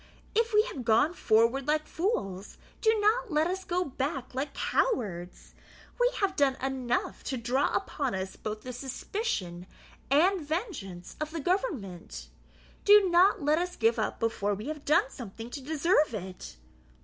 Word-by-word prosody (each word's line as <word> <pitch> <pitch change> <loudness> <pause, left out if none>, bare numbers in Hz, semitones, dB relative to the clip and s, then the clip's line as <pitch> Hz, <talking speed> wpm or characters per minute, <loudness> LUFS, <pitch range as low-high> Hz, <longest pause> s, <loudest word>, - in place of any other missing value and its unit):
If 460 +2 +2
we 425 0 +5
have 365 - -6
gone 230 +8 +3
forward 235 0 +2
like 305 0 +1
fools, 210 - -3 0.2
do 440 - +5
not 435 +2 +2
let 305 +1 +3
us 375 +2 -2
go 360 -1 -1
back 270 -1 -3
like 275 +2 -3
cowards. 190 - -1 0.5
We - - +4
have 385 -1 +1
done 280 -4 +3
enough 260 -2 -2
to 260 - -2
draw 245 +4 +1
upon 270 -7 -1
us 190 0 -4
both 215 0 -5
the 250 +2 -7
suspicion 245 - -4 0.4
and 350 +7 +4
vengeance 295 - -5
of 305 - -1
the 325 +1 -5
government; 195 - -3 0.5
do 410 -3 +7
not 355 -1 +5
let 300 +3 +3
us 360 0 -3
give 225 0 +2
up 215 - -2
before 205 -3 0
we 215 +8 -6
have 300 -2 -6
done 285 -2 +3
something 230 0 -8
to 280 - -6
deserve 305 - +2
it. 185 - -7
275 Hz, 160 wpm, -29 LUFS, 225-360 Hz, 0.5 s, do